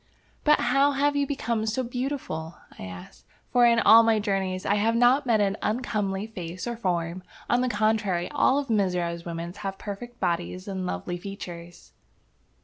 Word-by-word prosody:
"But 300 0 +5
how 275 +4 +3
have 285 +1 +1
you 285 -1 +1
become 230 -5 -2
so 235 +4 0
beautiful?" 245 - -4 0.2
I - - -6
asked. 90 0 -11 0.2
"For, 245 -1 +5
in 235 0 +4
all 225 0 +8
my 225 -1 +3
journeys, 195 -3 -1
I - - +2
have 220 +3 +2
not 250 +4 +4
met 225 -3 +3
an 200 0 +1
uncomely 210 -4 -1
face 180 -5 -7
or 240 -1 -3
form. 180 -4 -2 0.3
On 245 - +2
the 255 - +1
contrary, 210 -5 +1
all 285 -1 +3
the 250 -5 -2
Mizora 180 -4 0
women 170 0 -5
have 195 0 -5
perfect 235 +5 -8
bodies 175 +1 -2
and 190 -2 -3
lovely 90 - -3
features." 175 -3 -9
205 Hz, 170 wpm, -26 LUFS, 180-240 Hz, 0.3 s, all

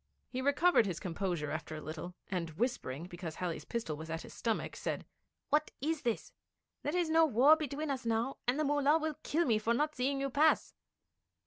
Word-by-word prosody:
He 255 - -3
recovered 285 - +4
his 180 -4 -3
composure 175 -4 -2
after 155 0 -4
a - - -5
little, 160 +3 -6
and 175 -3 -2
whispering, 190 - -1
because 175 -3 -7
Halley's 175 -3 -3
pistol 225 -10 -3
was 160 +2 -8
at 165 0 -3
his - - -11
stomach, 225 -2 -2
said: - - -3 0.5
'What 305 +1 +3
is 310 +2 -1
this? 235 -3 -2 0.5
There 300 +5 -1
is 340 -3 +1
no 325 0 +6
war 275 +4 +7
between 300 -1 -3
us 265 -2 -3
now, 230 +3 0
and 255 +4 +2
the - - +3
Mullah 290 +1 +4
will 315 -2 -3
kill 335 +3 +1
me 225 -4 +3
for 230 +2 +1
not 300 +3 +1
seeing 275 +1 0
you 275 0 -1
pass!' 305 +4 +3
250 Hz, 200 wpm, -33 LUFS, 180-295 Hz, 0.5 s, war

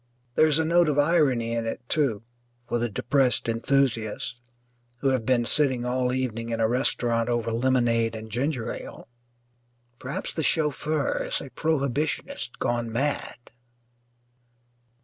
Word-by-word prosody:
There 155 - +5
is 150 -1 +3
a 160 - +1
note 170 0 +4
of 145 - 0
irony 145 -7 +3
in 115 -1 -1
it, - - -3
too, 130 -9 0 0.4
for 120 - 0
the 120 0 -1
depressed 130 +5 +1
enthusiasts 115 -1 0 0.7
who 135 - +2
have 130 -4 0
been 125 -2 +3
sitting 130 -3 +1
all 125 0 0
evening 120 -3 -2
in 115 -1 -2
a 110 - +3
restaurant 120 -1 +1
over 120 -1 0
lemonade 115 -2 +2
and 110 0 -8
ginger 130 +1 -1
ale. - - -9 0.9
Perhaps 135 +2 -4
the 160 - -2
chauffeur 150 -1 0
is - - -1
a 135 - -9
prohibitionist 150 - -1
gone 120 -1 -1
mad. 140 +4 -1
125 Hz, 140 wpm, -26 LUFS, 115-145 Hz, 0.9 s, There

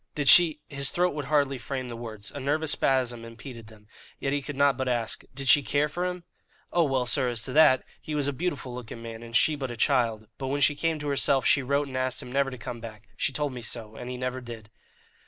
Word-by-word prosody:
"Did 145 -2 -1
she" 155 +1 +7
his 140 -2 0
throat 180 +1 +1
would 145 -2 -4
hardly 140 -2 +1
frame 130 +1 -4
the 120 - -6
words 110 -3 -7
a - - -7
nervous 145 +3 +2
spasm 125 -3 +2
impeded 115 0 -10
them; 105 -1 -17 0.3
yet 135 - -1
he 145 - 0
could 140 +1 -7
not 140 0 +3
but 130 0 -3
ask 120 -3 -2
"did 135 -1 -4
she 125 +4 +7
care 145 +2 +1
for 175 +5 -3
him?" 180 -1 -5 0.5
"Oh 170 -1 +4
well, 135 -3 0
sir, 130 +1 +2
as 115 -2 0
to 125 - -4
that, 150 -4 +6 0.2
he 155 - -5
was 145 -2 +2
a 145 - -1
beautiful 135 -5 -3
looking 120 -1 -8
man, 115 -1 -8
and 115 0 -8
she 155 +6 +4
but 135 -3 -4
a 120 - -7
child; 115 -4 +1
but 135 - -3
when 140 +2 -1
she 150 - +5
came 165 +2 -1
to 150 -1 -6
herself 135 -1 +2
she 140 - +4
wrote 140 +2 0
and 130 - -8
asked 130 0 -1
him 125 -3 -7
never 140 +1 +1
to 130 - -8
come 120 0 -7
back; 110 -2 -11
she - - -1
told 145 0 -2
me 125 - -7
so; 110 -1 -4
and 125 +2 -7
he 125 - -5
never 125 0 -3
did." 115 -3 -10
130 Hz, 255 wpm, -27 LUFS, 120-145 Hz, 0.5 s, she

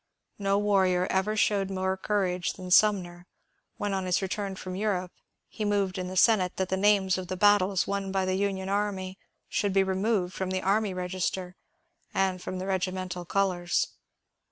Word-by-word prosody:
No 200 0 +1
warrior 190 -3 +2
ever 190 +3 +1
showed 200 -2 +2
more 190 0 -1
courage 190 -3 -1
than 185 -1 -8
Sumner 180 -3 +3 0.5
when, 205 -1 -2
on 190 -1 -1
his 180 - +2
return 195 0 -3
from 185 -1 -6
Europe, 185 -3 -1 0.4
he 215 - -6
moved 200 -2 0
in 180 - -3
the 185 +1 -5
Senate 185 -3 +4
that 190 -1 -1
the 190 - +1
names 190 -1 +3
of 185 - -6
the 185 - -4
battles 200 -1 +4
won 195 -1 -2
by 190 -1 0
the 185 - 0
Union 190 -1 -1
army 195 -1 -2 0.3
should 205 -2 -1
be 195 0 +4
removed 190 -1 0
from 190 -1 -3
the 185 0 -2
army 205 +1 +2
register 185 0 -3 0.6
and 190 -1 +1
from 185 - -5
the 185 - -4
regimental 185 -2 -2
colours. 180 -2 0
190 Hz, 175 wpm, -28 LUFS, 185-200 Hz, 0.6 s, Senate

